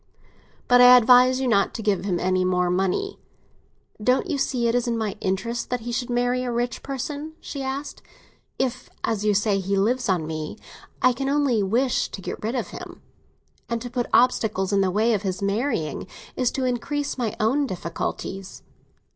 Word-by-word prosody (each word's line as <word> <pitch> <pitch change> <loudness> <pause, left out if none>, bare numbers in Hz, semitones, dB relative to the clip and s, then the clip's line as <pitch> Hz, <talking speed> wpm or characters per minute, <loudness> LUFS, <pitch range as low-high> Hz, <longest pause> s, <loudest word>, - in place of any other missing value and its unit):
But 245 0 +6
I 250 0 +10
advise 250 +2 +6
you 265 - 0
not 200 -4 +2
to 225 - -4
give 200 -2 0
him 180 -4 0
any 185 0 +1
more 180 -1 +1
money." 195 - -1 0.8
"Don't 250 +3 +2
you - - -1
see 245 -3 0
it 230 - +1
is 245 0 +1
in 235 -1 0
my 215 -3 -2
interest 230 +6 -2
that 250 -1 -2
he 240 +2 -5
should 245 +1 -2
marry 245 +1 +1
a 250 - -2
rich 240 +1 -2
person?" 285 +3 -5
she 280 - -6
asked. 270 +2 -5 0.6
"If, 255 -1 -2
as 215 -2 -1
you 210 -1 +2
say, 205 -1 +2
he 195 +1 -1
lives 235 +4 +1
on 175 -4 +1
me, 155 +4 -5 0.5
I 255 0 +5
can 270 +3 -2
only 280 -6 +2
wish 235 +6 +1
to - - -7
get 190 - -6
rid 225 +4 -2
of 250 - -2
him, - - -10 0.7
and 235 0 -1
to 245 +1 -7
put 245 -1 -1
obstacles 215 -6 +2
in 200 - +3
the 190 - +2
way 220 +5 +2
of 205 - 0
his 190 -3 -3
marrying 200 - -1 0.3
is 250 -2 +1
to 265 - -1
increase 280 +4 -2
my 230 -4 -1
own 270 +7 +2
difficulties." 185 +1 -5
235 Hz, 190 wpm, -24 LUFS, 195-255 Hz, 0.8 s, I